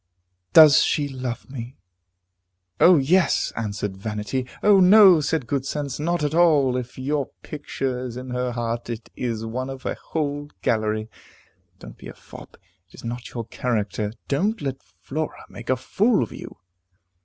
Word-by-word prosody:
Does 155 Hz, -3 st, +9 dB
she 145 Hz, -2 st, +1 dB
love 130 Hz, -3 st, -5 dB
me? 130 Hz, -1 st, -8 dB, 1.0 s
"O 180 Hz, -1 st, +7 dB
yes!" 170 Hz, +7 st, +2 dB
answered 105 Hz, -3 st, -3 dB
vanity. 105 Hz, +5 st, -4 dB, 0.2 s
"O 205 Hz, -2 st, +6 dB
no!" 190 Hz, -2 st, +8 dB
said 150 Hz, -2 st, -1 dB
good 135 Hz, +3 st, -1 dB
sense, 140 Hz, -1 st, -4 dB
"not 170 Hz, +1 st, -1 dB
at 145 Hz, 0 st, -1 dB
all. 150 Hz, -7 st, +4 dB
If 125 Hz, 0 st, -5 dB
your 140 Hz, +1 st, -1 dB, 0.2 s
picture 135 Hz, -4 st, -4 dB
is 125 Hz, -1 st, -6 dB
in 130 Hz, 0 st, -7 dB
her 125 Hz, 0 st, -2 dB
heart, 115 Hz, 0 st, -3 dB
it 115 Hz, -1 st, -7 dB
is 115 Hz, -3 st, -3 dB
one 130 Hz, +4 st, -4 dB
of 135 Hz, 0 st, -8 dB
a -, -, -1 dB
whole 145 Hz, -2 st, -4 dB
gallery. 110 Hz, -1 st, 0 dB, 0.7 s
Don't -, -, -13 dB
be -, -, -10 dB
a -, -, -10 dB
fop. -, -, -14 dB, 0.3 s
It -, -, -19 dB
is -, -, -13 dB
not 120 Hz, +2 st, -6 dB
your 115 Hz, -2 st, -3 dB
character. 105 Hz, -4 st, -2 dB, 0.2 s
Don't 205 Hz, +11 st, 0 dB
let 135 Hz, -1 st, -4 dB
Flora 155 Hz, +3 st, -6 dB
make -, -, -11 dB
a 130 Hz, -, +2 dB
fool 205 Hz, -, +1 dB
of 115 Hz, -, -7 dB
you." -, -, -10 dB
130 Hz, 165 wpm, -23 LUFS, 120-150 Hz, 1.0 s, Does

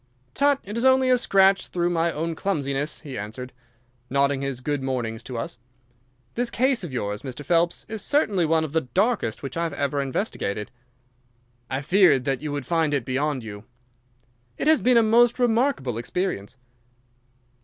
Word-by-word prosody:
"Tut, 280 Hz, 0 st, +3 dB
it 205 Hz, +2 st, -7 dB
is -, -, -2 dB
only 260 Hz, 0 st, +4 dB
a 250 Hz, -, +5 dB
scratch 195 Hz, -3 st, +3 dB
through 175 Hz, 0 st, -1 dB
my 170 Hz, 0 st, +1 dB
own 165 Hz, +2 st, -3 dB
clumsiness," 145 Hz, -5 st, -2 dB
he 140 Hz, -7 st, -7 dB
answered, 120 Hz, +5 st, -7 dB, 0.6 s
nodding 140 Hz, 0 st, +1 dB
his 135 Hz, -2 st, -3 dB
good 145 Hz, +1 st, -2 dB
mornings 120 Hz, -4 st, -3 dB
to 125 Hz, -3 st, -6 dB
us. 115 Hz, +1 st, -5 dB, 0.7 s
"This 245 Hz, 0 st, -1 dB
case 260 Hz, -3 st, +1 dB
of 170 Hz, -, -6 dB
yours, 105 Hz, -4 st, -3 dB
Mr. 135 Hz, +1 st, -7 dB
Phelps, 170 Hz, 0 st, +1 dB
is 220 Hz, -1 st, -5 dB
certainly 215 Hz, -, +1 dB
one 160 Hz, 0 st, +2 dB
of 155 Hz, -2 st, -5 dB
the 160 Hz, -, +2 dB
darkest 185 Hz, -, 0 dB
which 135 Hz, -, -5 dB
I 165 Hz, -, -1 dB
have 165 Hz, -3 st, -2 dB
ever 140 Hz, 0 st, -1 dB
investigated." 130 Hz, -, -3 dB, 1.0 s
"I 130 Hz, +1 st, -2 dB
feared 175 Hz, -4 st, +4 dB
that 135 Hz, 0 st, -1 dB
you 150 Hz, -1 st, -4 dB
would 145 Hz, -3 st, -4 dB
find 160 Hz, -1 st, +1 dB
it 130 Hz, -5 st, -2 dB
beyond 135 Hz, 0 st, -1 dB
you." 105 Hz, -1 st, -9 dB, 0.9 s
"It -, -, -2 dB
has 315 Hz, 0 st, +5 dB
been 250 Hz, -1 st, +4 dB
a 230 Hz, -, +6 dB
most 235 Hz, +2 st, +4 dB
remarkable 235 Hz, -, +1 dB
experience." 130 Hz, -, -3 dB
150 Hz, 175 wpm, -24 LUFS, 130-200 Hz, 1.0 s, a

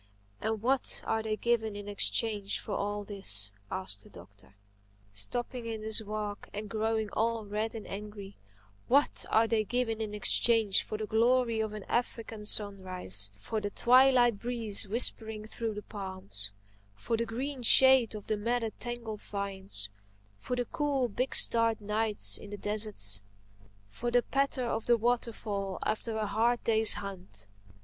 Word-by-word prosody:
And 220 Hz, 0 st, -2 dB
what 260 Hz, +1 st, +2 dB
are 220 Hz, -, 0 dB
they 220 Hz, -1 st, -3 dB
given 220 Hz, -3 st, 0 dB
in 205 Hz, 0 st, -8 dB
exchange 205 Hz, 0 st, +2 dB
for -, -, -8 dB
all 205 Hz, +1 st, -2 dB
this?" 105 Hz, -, 0 dB, 0.2 s
asked 95 Hz, +2 st, -3 dB
the -, -, -17 dB
Doctor, 100 Hz, +2 st, -16 dB, 0.6 s
stopping 235 Hz, -, -4 dB
in 220 Hz, -1 st, -5 dB
his 220 Hz, 0 st, +4 dB
walk 210 Hz, -1 st, -5 dB
and 210 Hz, 0 st, -6 dB
growing 220 Hz, -1 st, -1 dB
all 225 Hz, 0 st, -1 dB
red 215 Hz, +3 st, -3 dB
and 220 Hz, -, -7 dB
angry—"What 195 Hz, -, -3 dB
are 225 Hz, +1 st, +4 dB
they 220 Hz, -1 st, +1 dB
given 225 Hz, 0 st, -2 dB
in 210 Hz, -1 st, -4 dB
exchange 220 Hz, 0 st, +5 dB
for 215 Hz, -, -6 dB
the 215 Hz, -, -4 dB
glory 235 Hz, +1 st, +2 dB
of 220 Hz, -1 st, -2 dB
an 210 Hz, -2 st, -7 dB
African 225 Hz, -2 st, -3 dB
sunrise, 185 Hz, -, +3 dB
for 160 Hz, -, -4 dB
the 205 Hz, -, -3 dB
twilight 245 Hz, -1 st, +4 dB
breeze 225 Hz, -4 st, -2 dB
whispering 220 Hz, 0 st, +3 dB
through 220 Hz, 0 st, -4 dB
the 210 Hz, -, -7 dB
palms, 185 Hz, -, -6 dB, 0.4 s
for 230 Hz, -, -2 dB
the 230 Hz, +1 st, -2 dB
green 260 Hz, +3 st, -4 dB
shade 260 Hz, -1 st, +7 dB
of 210 Hz, -, -8 dB
the 215 Hz, -, -1 dB
matted, 230 Hz, +1 st, -2 dB
tangled 235 Hz, -3 st, -5 dB
vines, 195 Hz, -, -3 dB, 0.5 s
for 250 Hz, -, -3 dB
the 245 Hz, 0 st, -2 dB
cool, 275 Hz, -2 st, -1 dB
big 255 Hz, +5 st, -2 dB
starred 230 Hz, -1 st, +3 dB
nights 210 Hz, +1 st, 0 dB
of 205 Hz, -, -11 dB
the 205 Hz, -, -7 dB
desert, 205 Hz, -, -1 dB, 0.7 s
for 235 Hz, -, -4 dB
the 245 Hz, 0 st, +2 dB
patter 275 Hz, -2 st, 0 dB
of 225 Hz, -1 st, -3 dB
the 240 Hz, -1 st, +4 dB
waterfall 220 Hz, -4 st, -2 dB
after 220 Hz, +1 st, -2 dB
a 215 Hz, -, -1 dB
hard 230 Hz, +4 st, 0 dB
day's 220 Hz, -1 st, +4 dB
hunt? 180 Hz, -, -6 dB
215 Hz, 155 wpm, -30 LUFS, 200-230 Hz, 0.7 s, shade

